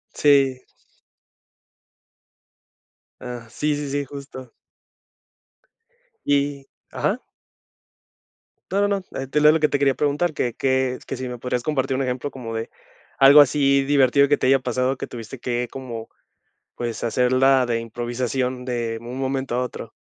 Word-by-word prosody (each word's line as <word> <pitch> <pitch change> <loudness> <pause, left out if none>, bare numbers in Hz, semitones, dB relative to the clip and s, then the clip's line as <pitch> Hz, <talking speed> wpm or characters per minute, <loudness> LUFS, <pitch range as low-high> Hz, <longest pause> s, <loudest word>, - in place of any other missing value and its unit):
Sí. 135 -3 +3 2.6
Ah, 125 -2 -7
sí, 150 +6 -1 0.2
sí, 145 +1 -1
justo. 130 -3 -10 1.7
Y 140 -1 0 0.3
ajá. - - -2 1.5
No, 200 +1 +2
no, 200 -2 -1 0.2
eh, 135 - -4
te 150 +3 0
leo 150 +1 +8
lo 160 - +2
que 150 - +2
te 145 - +1
quería 140 -1 +3
preguntar, 150 +4 0
que 120 -5 -2
que 130 -1 +1
s - - -14
que - - -5
sí 130 - -4
me 125 - -6
podrías 125 0 -2
compartir 135 -1 -1
un 135 - -1
ejemplo 130 +2 -2
como 115 -4 -7
de 115 0 -4 0.5
algo 140 +2 +9
así 140 -1 +3
divertido 140 0 +4
que 145 +1 +3
te - - 0
haya 135 0 +5
pasado, 130 +1 -1
que - - -4
tuviste 120 +1 -9
que 120 0 -2
como, 120 -4 -7 0.7
pues, 120 -1 -4
hacerla 130 +2 +3
de 115 -1 0
improvisación 125 +2 -3
de 120 -2 -2
un 120 +3 -7
momento 135 -1 -2
a 125 - +1
otro. 125 - -6
130 Hz, 145 wpm, -22 LUFS, 125-140 Hz, 2.6 s, algo